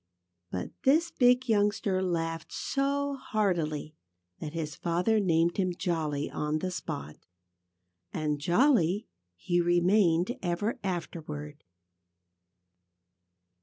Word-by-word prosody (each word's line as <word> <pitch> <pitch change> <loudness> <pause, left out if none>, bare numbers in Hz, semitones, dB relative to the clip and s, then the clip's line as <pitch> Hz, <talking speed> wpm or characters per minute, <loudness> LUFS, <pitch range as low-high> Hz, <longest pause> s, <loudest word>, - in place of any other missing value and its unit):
But 90 0 -4
this 325 +6 +3
big 250 -3 +4
youngster 205 -3 +2
laughed 165 -3 -2
so 280 0 -1
heartily 165 - -1 0.5
that 150 -1 -6
his 160 -2 -4
father 180 +6 +1
named 170 -3 +2
him 185 -2 0
"Jolly," 155 -4 -1
on 150 +1 -2
the 185 +4 -3
spot. 75 - -5 0.9
And 150 -2 -1
"Jolly" 195 - +3 0.3
he 175 - 0
remained 175 +4 +3
ever 205 +8 -1
afterward. 155 -5 -5
175 Hz, 95 wpm, -29 LUFS, 155-215 Hz, 0.9 s, big